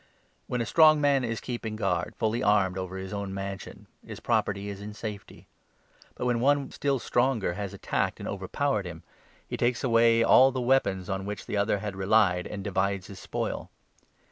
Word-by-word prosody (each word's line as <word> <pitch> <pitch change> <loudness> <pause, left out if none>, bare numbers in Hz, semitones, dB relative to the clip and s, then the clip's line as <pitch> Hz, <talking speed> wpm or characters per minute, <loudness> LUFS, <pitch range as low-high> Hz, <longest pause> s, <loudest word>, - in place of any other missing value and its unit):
When 125 -1 -1
a - - -1
strong 155 +7 +6
21 - - -3
man 140 -2 +3
is 115 - -3
keeping 120 -3 -5
guard, 95 -5 -1
fully 110 +1 0
armed, 100 -3 +3
over 95 0 -5
his 95 +1 -6
own 100 -1 -4
mansion, 100 0 -6 0.2
his - - -9
property 100 0 0
is 100 -1 -6
in 105 +1 -8
safety; 105 -2 -8 0.7
but, - - -4
when 120 -1 +1
one 140 +2 +2
still 140 -1 0
stronger 120 -6 0
has 100 +1 -5
attacked - - -1
22 - - -13
and - - -5
overpowered 100 +2 -1
him, 85 -2 -9 0.4
he - - -4
takes 120 +1 0
away 115 -2 +4
all 130 +3 +6
the 130 - -3
weapons 120 -8 +1
on 95 0 -3
which 105 - -5
the - - -4
other 100 +1 +2
had 100 0 -5
relied, 95 -2 +2
and 100 -2 -6
divides 100 -1 -1
his 95 -1 -10
spoil. - - -4
105 Hz, 195 wpm, -27 LUFS, 95-120 Hz, 0.7 s, strong